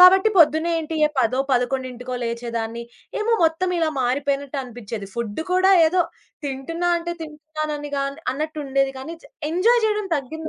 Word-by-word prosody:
కాబట్టి, 380 +3 +8
పొద్దున్నే 315 +1 +5
ఏంటి 320 0 -4
ఏ - - -1
పదో, 250 +2 +1
11కో 250 0 -1
లేచేదాన్ని, 235 -1 -3 0.4
ఏమో 455 +2 +1
మొత్తం 325 +3 +1
ఇలా 325 - +2
మారిపోయినట్టనిపిచ్చేది. 255 -5 -2
ఫుడ్డు 235 +4 -3
కూడా 370 +1 +5 0.2
ఏదో 360 +3 +2 0.4
తింటున్నా 290 +6 -2
అంటే 345 0 -4
తింటున్నాను 310 0 -5
అని 290 0 -6
గాన్ 275 0 -1 0.2
అన్నట్టుండేది 275 -2 -1
కానీ 315 +6 -6 0.4
ఎంజాయ్ 450 +8 +4
చేయడం 425 -1 0
తగ్గింద 315 +4 -5
290 Hz, 135 wpm, -23 LUFS, 255-330 Hz, 0.4 s, కాబట్టి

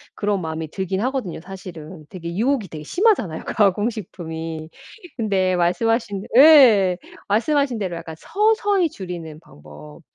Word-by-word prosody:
그런 205 -2 -1
마음이 160 -1 -5
들긴 190 0 -3
하거든요 250 -10 -3
사실은. 175 -4 -10
되게 170 -2 -7
유혹이 235 -1 0
되게 155 -1 -8
심하잖아요 300 - +1
가공식품이. 175 -7 -2 0.5
근데 190 -4 +1
말씀하신 210 +3 0
예. 240 - +7 0.3
말씀하신 250 +3 +1
대로 185 -4 -3
약간 165 -1 -8
서서히 410 - +1
줄이는 170 - -8
방법. 75 - -14
190 Hz, 320 characters per minute, -21 LUFS, 165-235 Hz, 0.5 s, 예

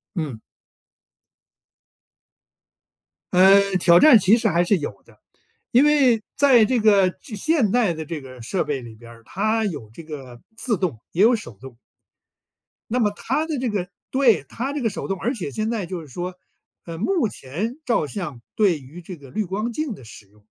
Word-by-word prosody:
嗯。 145 -10 -4 2.9
嗯， 195 +1 +5
挑 175 0 +6
战 290 -7 +8
其 205 +4 +4
实 225 -1 0
还 175 -2 +2
是 190 +2 +2
有 125 -10 -7
的， - - -22 0.5
因 250 +4 +5
为 270 -7 +4 0.2
在 265 -5 +6
这 240 +2 +1
个 200 -3 +4
这 215 +4 -10
现 260 -4 +1
代 225 -8 +2
的 160 -1 -6
这 155 -2 -6
个 130 -2 -12
设 175 - -1
备 140 -3 -3
里 115 -2 -11
边 115 +1 -14
儿， 115 -1 -16
它 215 - 0
有 145 - -5
这 165 - -10
个 135 -6 -10
自 225 -5 -1
动 155 - -3
也 180 - -1
有 235 +2 +5
手 120 - -9
动。 130 -2 -12 1.1
那 250 - 0
么 210 -3 +2
它 295 +6 -1
的 310 -4 -3
这 250 -2 -1
个 195 -3 -3 0.2
对， 240 - +3
它 265 +4 -4
这 295 - -3
个 225 - +1
手 200 - -6
动 195 -3 -3
而 245 +4 -1
且 170 -10 -5
现 215 +6 -2
在 220 -6 -2
就 175 -1 -6
是 155 - -12
说， 175 +6 -6 0.5
呃， 165 -1 -7
目 310 - +1
前 200 - -5
照 230 -11 +1
相 150 - -6
对 190 -8 +2
于 145 +7 -12
这 175 0 -9
个 140 -2 -14
滤 215 +7 -2
光 210 +6 -3
镜 305 -4 -3
的 135 - -13
使 105 - -12
用 105 +1 -27
190 Hz, 205 characters per minute, -22 LUFS, 150-230 Hz, 2.9 s, 战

